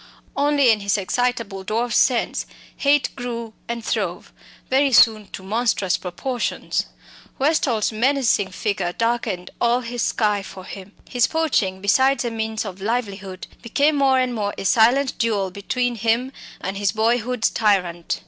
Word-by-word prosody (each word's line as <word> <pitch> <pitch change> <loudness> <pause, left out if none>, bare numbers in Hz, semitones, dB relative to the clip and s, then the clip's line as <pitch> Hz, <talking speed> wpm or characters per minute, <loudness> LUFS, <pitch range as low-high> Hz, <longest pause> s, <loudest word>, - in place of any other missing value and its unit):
Only 285 -3 +4
in 215 - +2
his 200 0 0
excitable 225 -1 -2
dwarf's 230 +4 0
sense 250 -3 +1 0.3
hate 285 0 +2
grew 235 -3 -5
and 235 -1 -4
throve, 190 -6 -3 0.3
very 270 +1 +3
soon 220 -3 +5
to 190 - -9
monstrous 205 -2 0
proportions. 235 +8 -3 0.5
Westall's 270 -7 +1
menacing 235 -3 +1
figure 190 -2 -2
darkened 230 -5 -2
all 240 +1 +3
his 240 0 -4
sky 210 -2 +1
for 190 -1 -10
him. 195 +1 -10
His 245 -2 +2
poaching, 230 - 0
besides 260 +7 +3
a 235 - -2
means 220 -1 -3
of 190 -1 -8
livelihood, 200 -4 -3 0.2
became 285 +6 +2
more 270 -2 +3
and 255 -1 +1
more 205 -3 -2
a - - -5
silent 245 +7 +3
duel 205 -5 0
between 245 +6 -2
him 230 +4 0 0.3
and 190 +1 -4
his 200 -1 +1
boyhood's 230 +1 +1
tyrant. 180 -6 0
225 Hz, 145 wpm, -22 LUFS, 200-250 Hz, 0.5 s, soon